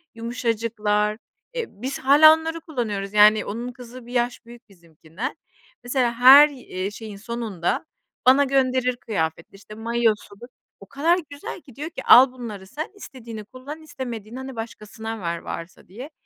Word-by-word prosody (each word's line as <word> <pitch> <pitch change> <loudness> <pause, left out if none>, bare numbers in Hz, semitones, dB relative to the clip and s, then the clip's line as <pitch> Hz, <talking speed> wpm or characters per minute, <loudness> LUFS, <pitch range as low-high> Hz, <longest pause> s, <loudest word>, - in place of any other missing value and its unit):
yumuşacıklar, 225 -3 -1 0.4
eee, 480 -2 -2
biz 260 +7 -6
hâlâ 295 +4 +8
onları 325 +1 -3
kullanıyoruz, 215 -10 -4
yani, 210 +1 +6
onun 235 +4 -5
kızı 245 0 -12
1 240 - -11
yaş 240 -1 -1
büyük 235 0 -15
bizimkinden. 170 - -8 0.5
Mesela 245 -1 0
her, 265 +5 +9
iii, 200 -8 -6
şeyin 215 -1 -9
sonunda 215 -5 -3 0.4
bana 265 +3 +6
gönderir 260 -2 +1
kıyafetleri, 165 -8 -4
işte, 205 +2 -13
mayosudur, 225 -1 -1 0.3
o 195 - -13
kadar 330 +6 +1
güzel 285 +4 -8
ki, 260 -6 -17
diyor 300 +3 -5
ki, 270 -5 -8
"Al 255 +1 +8
bunları 220 -7 -8
sen, 310 - -6
istediğini 230 - -10
kullan 270 +7 -10
istemediğini, 245 -6 -7
hani, 265 0 -7
başkasına 225 0 -7
ver, 170 -1 -2
varsa." 170 +2 -8
diye. 250 - -10
235 Hz, 150 wpm, -23 LUFS, 210-265 Hz, 0.5 s, her